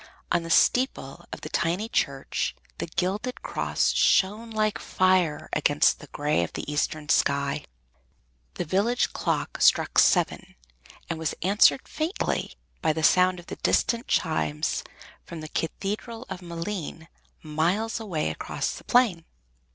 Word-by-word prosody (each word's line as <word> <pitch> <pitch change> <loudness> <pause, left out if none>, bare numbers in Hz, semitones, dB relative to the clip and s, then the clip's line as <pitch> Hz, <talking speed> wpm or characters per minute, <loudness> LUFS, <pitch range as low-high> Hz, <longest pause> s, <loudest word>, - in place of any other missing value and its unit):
On 175 - +3
the 165 - -7
steeple 255 +9 +2
of - - -7
the - - -7
tiny 175 +6 0
church 140 - -1 0.2
the - - -3
gilded 190 +9 -2
cross - - 0
shone 210 +4 +2
like 215 -1 0
fire 185 -5 +1
against 150 0 +3
the 150 - -12
gray 145 - 0
of 85 - -4
the - - -5
eastern 150 0 -1
sky. 140 -2 +1 0.9
The - - -3
village 205 +9 +1
clock - - -2
struck - - +4
seven - - +2 0.5
and 165 -1 -4
was 160 -1 -2
answered 205 +7 +4
faintly 320 +6 -2 0.3
by 155 - +2
the 160 +1 -3
sound 185 +2 +4
of 175 - -12 0.2
distant 235 +1 +1
chimes 155 -2 0 0.4
from 170 -2 -8
the 155 - -7
Cathedral 215 +9 -4
of 180 - -5
Malines, 170 -1 -5 0.4
miles 175 +9 0
away 185 -9 -2
across - - -3
the - - -10
plain. 230 -10 +3
175 Hz, 135 wpm, -26 LUFS, 155-215 Hz, 0.9 s, struck